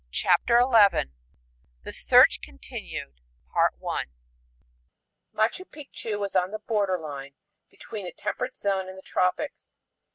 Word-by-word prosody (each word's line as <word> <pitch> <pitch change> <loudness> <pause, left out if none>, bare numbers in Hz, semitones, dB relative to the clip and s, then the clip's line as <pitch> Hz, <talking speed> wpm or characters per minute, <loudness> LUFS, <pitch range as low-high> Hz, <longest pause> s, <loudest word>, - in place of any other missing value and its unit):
CHAPTER 235 - +3
XI 210 - +4 0.7
The - - -7
Search - - +5
Continued 70 -1 -8 2.2
Machu 365 +11 -5
Picchu 225 -8 -5
is 195 - -7
on 185 0 +2
the 215 - -4
border 205 -4 0
line 140 -3 -8 0.3
between 210 -4 -8
the 175 - -5
temperate 255 +1 -3
zone 190 -2 -1
and 190 - -10
the 190 - -12
tropics. 185 +11 -1
195 Hz, 110 wpm, -26 LUFS, 180-225 Hz, 2.2 s, Search